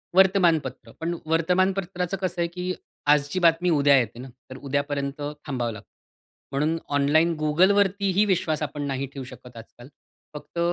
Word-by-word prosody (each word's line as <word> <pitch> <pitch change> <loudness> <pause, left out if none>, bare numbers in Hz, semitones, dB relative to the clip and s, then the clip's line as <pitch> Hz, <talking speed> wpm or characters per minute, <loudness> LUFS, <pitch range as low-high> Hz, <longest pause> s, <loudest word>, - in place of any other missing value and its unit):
वर्तमानपत्र 170 - +3
पण 170 +1 -2
वर्तमानपत्राचं 180 +3 0
कसं 180 -2 -2
आहे 170 - +1
की 180 +1 -4 0.4
आजची 145 +5 0
बातमी 170 0 +3
उद्या 145 -3 +5
येते 120 -1 -4
ना, 130 +1 -8 0.2
तर 130 - -8
उद्यापर्यंत 140 +1 -3 0.2
थांबावं 125 -4 -2
लागतं. 105 - -12 0.6
म्हणून 150 +4 0 0.2
ऑनलाईन 155 +4 +3
Googleवरती 195 +5 +3
ही 210 - +5
विश्वास 170 -6 0
आपण 145 -1 -4
नाही 135 0 -2
ठेवू 135 - -6
शकत 125 -1 -13
आजकाल. 120 +2 -13 0.5
फक्त 150 +3 -8
155 Hz, 145 wpm, -25 LUFS, 140-180 Hz, 0.6 s, उद्या